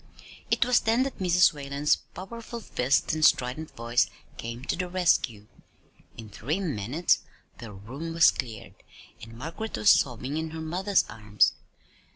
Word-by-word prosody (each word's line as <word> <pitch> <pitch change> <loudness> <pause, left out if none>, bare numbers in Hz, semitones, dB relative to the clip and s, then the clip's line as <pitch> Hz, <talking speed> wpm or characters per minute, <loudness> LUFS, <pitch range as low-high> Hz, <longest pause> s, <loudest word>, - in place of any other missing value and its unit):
It - - +3
was 250 0 +4
then 230 +3 +2
that 270 - -5
Mrs. 180 -2 +4
Whalen's 140 0 0
powerful 230 +4 -9
fist 135 - 0
and 155 0 -1
strident 135 +3 +2
voice 120 +1 +1 0.3
came 115 +3 -7
to - - -1
the 180 -1 -3
rescue. 165 - +1 0.7
In 115 -1 -9
three 140 - -2
minutes 150 - 0 0.4
the 115 -3 -8
room 125 +12 -7
was 165 - +7
cleared, 115 -5 -6 0.5
and 115 +1 -11
Margaret 165 - -5
was 205 - +6
sobbing 130 +2 +1
in 160 0 -3
her 160 +1 -7
mother's 185 +5 +1
arms. 105 -1 +1
150 Hz, 150 wpm, -27 LUFS, 120-180 Hz, 0.7 s, was